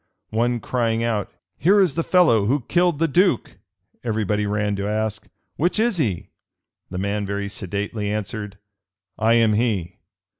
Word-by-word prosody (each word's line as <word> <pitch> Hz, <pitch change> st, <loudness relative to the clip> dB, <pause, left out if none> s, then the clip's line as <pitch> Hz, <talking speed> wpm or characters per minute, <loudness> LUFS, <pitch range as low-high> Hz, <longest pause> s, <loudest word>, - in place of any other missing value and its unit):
One 120 Hz, +2 st, +1 dB
crying 115 Hz, 0 st, 0 dB
out, 110 Hz, -4 st, -1 dB, 0.3 s
"Here 195 Hz, +6 st, +5 dB
is 185 Hz, -7 st, +3 dB
the 165 Hz, -, 0 dB
fellow 160 Hz, -, +4 dB
who 135 Hz, +6 st, +1 dB
killed 175 Hz, -2 st, +2 dB
the 165 Hz, +2 st, +2 dB
duke;" 175 Hz, -, +1 dB, 0.5 s
every 110 Hz, -2 st, -1 dB
body 105 Hz, +1 st, 0 dB
ran 105 Hz, 0 st, 0 dB
to 100 Hz, +1 st, -2 dB
ask, 110 Hz, 0 st, -2 dB, 0.3 s
"Which 175 Hz, +7 st, +1 dB
is 225 Hz, -3 st, +2 dB
he?" 105 Hz, -, -2 dB, 0.6 s
The 90 Hz, -, -6 dB
man 100 Hz, +2 st, -1 dB
very 100 Hz, 0 st, -3 dB
sedately 100 Hz, +2 st, -4 dB
answered, 105 Hz, -1 st, -4 dB, 0.6 s
"I 110 Hz, +1 st, +4 dB
am 115 Hz, -2 st, +4 dB
he." 105 Hz, -6 st, -1 dB
110 Hz, 155 wpm, -22 LUFS, 105-135 Hz, 0.6 s, Here